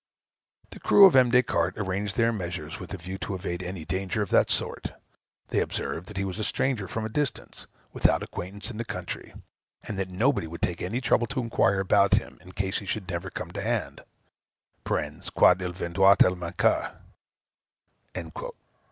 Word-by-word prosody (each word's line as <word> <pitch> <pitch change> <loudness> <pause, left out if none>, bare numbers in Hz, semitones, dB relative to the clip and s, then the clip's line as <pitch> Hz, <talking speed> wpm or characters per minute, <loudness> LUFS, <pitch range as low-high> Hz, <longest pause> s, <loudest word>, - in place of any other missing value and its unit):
The - - -10
crew 200 - +7
of 190 - +6
M. 130 -2 +6
Des 125 +1 +5
Cartes - - 0
arranged 100 0 -2
their 115 -1 +3
measures 90 -2 -5
with 90 - -9
a 100 - -4
view 95 +2 -7
to 100 - -4
evade 90 -1 -4
any 90 -3 -6
danger 95 +4 -1
of 100 - -8
that - - +4
sort. - - -2 0.6
They - - +1
observed 90 +2 -3
that 105 - -9
he 100 - 0
was 95 +2 -4
a - - -1
stranger 120 -4 0
from 110 -1 -3
a - - -1
distance, 140 +4 -3 0.3
without - - +2
acquaintance 100 +5 -5
in 110 - -8
the 115 - -2
country, 90 -6 -6 0.5
and 100 - -5
that 95 -1 -2
nobody 110 +1 +1
would 85 +1 -8
take 85 -1 -1
any 110 +8 -2
trouble 120 -2 +2
to 135 -1 -3
inquire 105 -5 +2
about 100 +1 +4
him, - - -3
in 90 +1 -14
case 95 0 -1
he 100 - -10
should 95 -1 -3
never 85 +1 -3
come - - -6
to - - -5
hand, - - -2 0.8
(quand 95 - +2
il 90 -1 -2
viendroit 95 +2 +4
à 90 - +5
manquer.") 85 -1 0
95 Hz, 185 wpm, -27 LUFS, 90-110 Hz, 0.8 s, crew